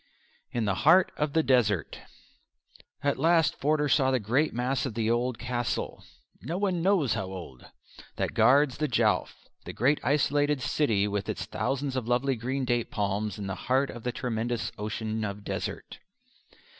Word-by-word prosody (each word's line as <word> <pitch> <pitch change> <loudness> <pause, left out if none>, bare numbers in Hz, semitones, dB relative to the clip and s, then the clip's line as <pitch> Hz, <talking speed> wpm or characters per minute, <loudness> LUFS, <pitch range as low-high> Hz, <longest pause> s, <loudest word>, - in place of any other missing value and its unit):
In 120 -2 -2
the 100 -2 -1
Heart 170 +5 +6
of 150 -1 -1
the 160 - +3
Desert 120 - +1 1.0
At 140 -1 0
last 165 +1 +3
Forder 150 +1 +1
saw 135 -1 +3
the 130 -1 +2
great 130 +9 +1
mass 125 +2 -1
of 115 - -7
the 115 -1 +1
old 120 0 0
castle, 120 0 -3 0.4
"no 170 - -4
one 185 -4 0
knows 175 - +2
how 95 - -3
old," 90 -9 -9 0.5
that - - -2
guards 130 +5 +4
the 155 - +1
Jowf 125 - 0 0.2
that - - -6
great 140 +6 +2
isolated 145 0 +2
city 115 -5 +1
with 100 -1 -3
its - - -3
thousands 135 0 -2
of 125 -3 -2
lovely 125 +2 +1
green 130 +3 -2
date 120 -1 0
palms 105 -1 -2
in 100 - -5
the 95 - -3 0.2
heart 135 +2 +2
of 120 - -9
the 125 - -2
tremendous 120 -1 -2
ocean 110 +1 -3
of 100 -1 -5
desert. - - -5
125 Hz, 170 wpm, -28 LUFS, 110-145 Hz, 1.0 s, Heart